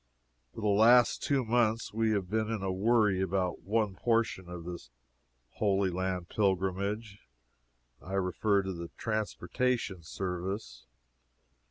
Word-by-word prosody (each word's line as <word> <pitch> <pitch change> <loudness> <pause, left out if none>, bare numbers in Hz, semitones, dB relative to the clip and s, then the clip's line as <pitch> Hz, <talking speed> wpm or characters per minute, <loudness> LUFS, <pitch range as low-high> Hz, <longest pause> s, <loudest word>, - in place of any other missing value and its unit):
For 115 - -6
the 105 - 0
last 115 +4 +5
two 135 -4 +1
months 115 -1 +1
we 110 0 +1
have 100 -4 0
been 110 +2 -1
in 110 -4 -2
a 95 - 0
worry 105 0 +2
about 95 -1 -1
one 105 +1 0
portion 115 -4 0
of 90 -1 -7
this 85 -8 -7 0.7
Holy 100 -2 +2
Land 90 -1 -2
pilgrimage. 100 +2 -1 0.8
I 95 - -8
refer 95 +2 +1
to 85 -3 -5
transportation 110 -1 -1
service. 90 - -5
100 Hz, 125 wpm, -30 LUFS, 95-110 Hz, 0.8 s, last